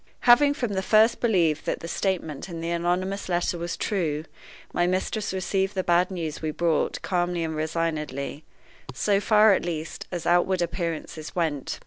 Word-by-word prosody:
Having 285 +4 +6
from 240 -7 -2
the 190 - 0
first 220 +4 +4
believed 170 -9 +1
that - - -1
the 165 - -6
statement 170 -4 -2
in 170 -1 -6
the 165 +1 -3
anonymous 180 +3 -1
letter 175 0 0
was 170 +1 -4
true, 160 -7 -1 0.5
my 175 - +2
mistress 190 +4 -1
received 190 +1 -1
the 185 - 0
bad 175 +1 +3
news 165 -5 -4
we 155 - -2
brought 160 0 0
calmly 175 -2 0
and 160 -1 -3
resignedly 155 -3 -3 0.5
so 200 +8 +2
far, 215 0 +5
at - - 0
least, 165 -2 -5
as 175 -2 -4
outward 175 +2 +3
appearances 165 -2 -4
went. 155 -6 -2
175 Hz, 165 wpm, -25 LUFS, 160-190 Hz, 0.5 s, Having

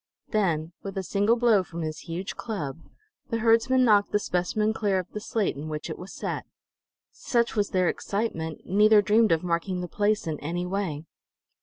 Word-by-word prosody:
Then, 170 -7 0
with 195 -1 -6
a 190 - -1
single 205 +4 +2
blow 230 -4 +4
from 170 -2 -6
his 155 0 -4
huge 180 +3 -5
club, 165 - -4 0.5
the 230 - 0
herdsman 230 +3 +4
knocked 205 -3 +4
the - - +3
specimen 210 +3 0
clear 205 -3 0
of 185 - -1
the 210 - -4
slate 210 -1 -1
in 150 +3 -6
which 150 -1 -4
it - - -7
was 185 +2 -9
set. - - -4 0.6
Such 235 -1 0
was 205 -1 +1
their 185 -1 +2
excitement, 165 -8 -2
neither 210 +2 +5
dreamed 215 +1 +4
of 165 0 +2
marking 180 +1 -1
the 180 - -4
place 210 +4 0
in 155 -2 -3
any 175 +4 -3
way. 180 -5 -3
195 Hz, 185 wpm, -26 LUFS, 170-215 Hz, 0.6 s, neither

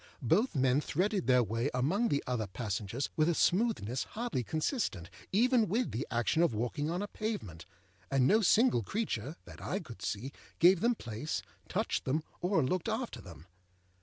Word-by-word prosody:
Both 190 - +2
men 130 +1 +3
threaded 190 +5 0
their 125 -1 +5
way 115 +5 -1
among 170 - +2
the 145 - 0
other 120 -4 -1
passengers 105 +4 -3
with 155 +1 +3
a 170 - +1
smoothness 175 - +1
hardly 230 - -1
consistent 135 - -2 0.2
even 235 +2 +4
with 235 +5 0
the 125 +5 -3
action 120 +7 +1
of 170 -10 +2
walking 125 +7 -1
on 175 +4 -1
a - - -3
pavement; 155 - -5 0.4
and 135 -2 +3
no 215 +10 +5
single 220 - +4
creature, 145 - -3
that - - -12
I 195 - -2
could 125 - -11
see, 120 +7 -3 0.3
gave 180 +1 +6
them 235 +4 +2
place, 120 - -4 0.3
touched - - -1
them, 150 +4 0 0.2
or 180 -3 +2
looked 180 - -1
after 220 - -3
them. 85 -4 -12
150 Hz, 170 wpm, -32 LUFS, -, 0.4 s, gave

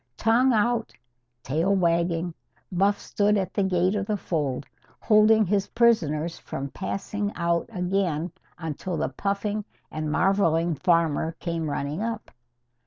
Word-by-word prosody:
Tongue 240 +4 +3
out, 225 - +1 0.5
tail 165 +9 +1
wagging, 170 -1 +1 0.4
Buff 195 +3 +2
stood 205 0 +1
at 190 -2 -2
the 205 - +1
gate 185 0 +2
of 200 -1 -2
the 210 - 0
fold, 145 -7 -2 0.3
holding 215 0 +5
his 200 +1 +1
prisoners 170 -9 +2
from 135 +1 -5
passing 205 +1 -3
out 170 +1 0
again 180 -4 -1 0.3
until 165 +2 -4
the - - -1
puffing 200 +8 -2 0.3
and 155 -1 -3
marvelling 170 -2 +2
farmer 165 0 +1
came 165 -2 -3
running 145 +5 -3
up. 225 -1 -4
180 Hz, 130 wpm, -25 LUFS, 165-205 Hz, 0.5 s, holding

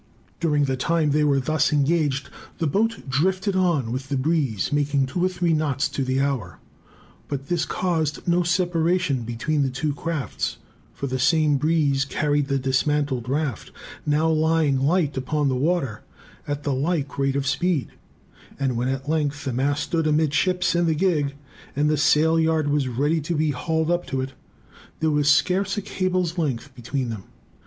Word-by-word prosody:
During 150 -4 +2
the 135 -1 0
time 155 +3 +1
they 150 +1 +2
were 140 -2 +3
thus 155 +3 +1
engaged, 145 -2 +1 0.3
the 165 - -1
boat 220 +5 0
drifted 185 +8 0
on 170 -11 +1
with 130 +2 -4
the 140 - 0
breeze, 135 - 0
making 145 -1 +1
two 155 +7 -2
or 185 - +3
three 175 -2 0
knots 145 -3 0
to 135 - -2
the 130 +1 0
hour. 135 -10 -2 0.7
But 140 -1 -5
this 175 -2 +1
caused 160 -5 -1
no 175 +1 +3
separation 175 -4 +1
between 120 +6 -1
the 135 - +1
two 145 +3 -2
crafts; 160 -1 -3 0.3
for - - -6
the 130 -1 -2
same 150 +1 +3
breeze 145 -2 +2
carried 145 +1 0
the 140 -1 +1
dismantled 135 -1 0
raft 140 -5 -2 0.3
now 150 +2 +2
lying 160 -3 +2
light 150 0 +1
upon 145 +2 0
the 130 - 0
water 135 -5 0 0.5
at 145 0 -3
the 145 - 0
like 145 +1 -1
rate 135 0 +1
of 140 -1 -1
speed; 145 +2 0 0.7
and 135 -3 0
when 120 +2 -1
at 135 +1 -3
length 145 -2 -1
the 130 - -2
mast 140 +4 0
stood 165 -3 0
amidships 160 +4 +2
in 170 0 +2
the 160 - +2
gig, 150 -5 +1 0.4
and 150 +2 +2
the - - +3
sailyard 160 +1 +3
was 145 -2 +1
ready 145 +6 0
to 165 +4 -2
be 155 0 +1
hauled 160 +4 -1
up 175 0 0
to 135 - -2
it, 130 0 -5 0.7
there 160 -1 +1
was 145 -1 +2
scarce 190 +6 +2
a - - 0
cable's 185 -2 -1
length 140 -3 -2
between 125 0 -3
them. 105 -4 -7
150 Hz, 175 wpm, -23 LUFS, 135-165 Hz, 0.7 s, were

